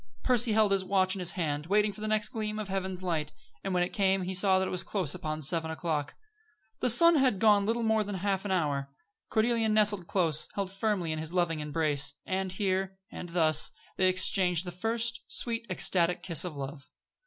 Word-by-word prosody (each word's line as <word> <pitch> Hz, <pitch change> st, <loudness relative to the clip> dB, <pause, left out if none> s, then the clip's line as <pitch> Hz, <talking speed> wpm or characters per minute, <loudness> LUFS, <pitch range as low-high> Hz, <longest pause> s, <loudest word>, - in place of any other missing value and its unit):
Percy 240 Hz, -3 st, +2 dB
held 215 Hz, -2 st, +3 dB
his 195 Hz, -1 st, +2 dB
watch 185 Hz, 0 st, +1 dB
in 195 Hz, -, -5 dB
his 175 Hz, -1 st, +1 dB
hand, 150 Hz, -4 st, -3 dB
waiting 210 Hz, +2 st, +2 dB
for 210 Hz, -, -11 dB
the 215 Hz, -, -3 dB
next 215 Hz, -1 st, 0 dB
gleam 215 Hz, -1 st, -4 dB
of 210 Hz, -2 st, -5 dB
heaven's 190 Hz, -1 st, -4 dB
light, 155 Hz, -4 st, -2 dB, 0.3 s
and 195 Hz, -, -3 dB
when 180 Hz, -1 st, +1 dB
it 180 Hz, -, -4 dB
came 195 Hz, -2 st, +1 dB
he 185 Hz, +1 st, -3 dB
saw 190 Hz, 0 st, +3 dB
that 190 Hz, 0 st, 0 dB
it -, -, -5 dB
was 180 Hz, -, 0 dB
close 185 Hz, -9 st, -1 dB
upon 155 Hz, 0 st, -5 dB
seven 160 Hz, +2 st, 0 dB
o'clock. 160 Hz, -3 st, -3 dB, 0.6 s
The 250 Hz, -, +1 dB
sun 335 Hz, +7 st, +6 dB
had 265 Hz, -3 st, +3 dB
been 195 Hz, -, -8 dB
gone 205 Hz, -2 st, +4 dB
little 230 Hz, +1 st, 0 dB
more 220 Hz, -1 st, +2 dB
than 205 Hz, -1 st, -5 dB
half 195 Hz, 0 st, -1 dB
an 205 Hz, -, -5 dB
hour. 145 Hz, -7 st, -1 dB, 0.4 s
Cordelia 225 Hz, 0 st, +1 dB
nestled 210 Hz, -4 st, +3 dB
close, 165 Hz, -5 st, +1 dB
held 195 Hz, -2 st, -3 dB
firmly 195 Hz, -4 st, -1 dB
in 155 Hz, -, -3 dB
his 160 Hz, +2 st, -4 dB
loving 170 Hz, -3 st, 0 dB
embrace. 150 Hz, -2 st, 0 dB
And 190 Hz, 0 st, -2 dB
here, 190 Hz, 0 st, -2 dB
and 175 Hz, -, -8 dB
thus, 160 Hz, -3 st, +3 dB, 0.3 s
they 185 Hz, -, +2 dB
exchanged 185 Hz, -1 st, +2 dB
the 175 Hz, -, -5 dB
first 230 Hz, +6 st, -2 dB
sweet, 230 Hz, -1 st, -2 dB
ecstatic 180 Hz, -1 st, +1 dB
kiss 170 Hz, -4 st, 0 dB
of 175 Hz, -4 st, -6 dB
love. 140 Hz, +1 st, -7 dB
185 Hz, 210 wpm, -29 LUFS, 165-210 Hz, 0.6 s, sun